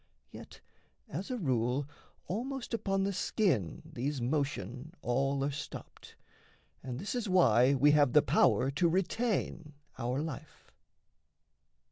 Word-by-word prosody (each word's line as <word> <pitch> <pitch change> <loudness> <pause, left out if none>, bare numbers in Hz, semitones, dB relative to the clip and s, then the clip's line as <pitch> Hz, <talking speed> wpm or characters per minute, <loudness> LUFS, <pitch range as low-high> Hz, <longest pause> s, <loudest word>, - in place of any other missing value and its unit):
Yet - - -12 0.5
as 180 +7 -5
a 255 - -2
rule, 130 - 0 0.4
almost 250 +6 -4
upon 195 -4 0
the 200 +1 0
skin 170 - 0
These 140 +3 -3
motion 135 - -2
aIl 135 +3 +1
are - - -2
stopped, 145 - -9 0.7
and 125 -2 -5
this 200 - -4
is 240 -5 -2
why 135 -7 +5
We 145 +3 +5
have 145 -3 +4
the 150 - +6
power 135 - +3
to 165 +5 +2
retain 185 -3 -1 0.3
our 125 +2 -1
life. 155 -1 -8
145 Hz, 125 wpm, -32 LUFS, 130-190 Hz, 0.7 s, the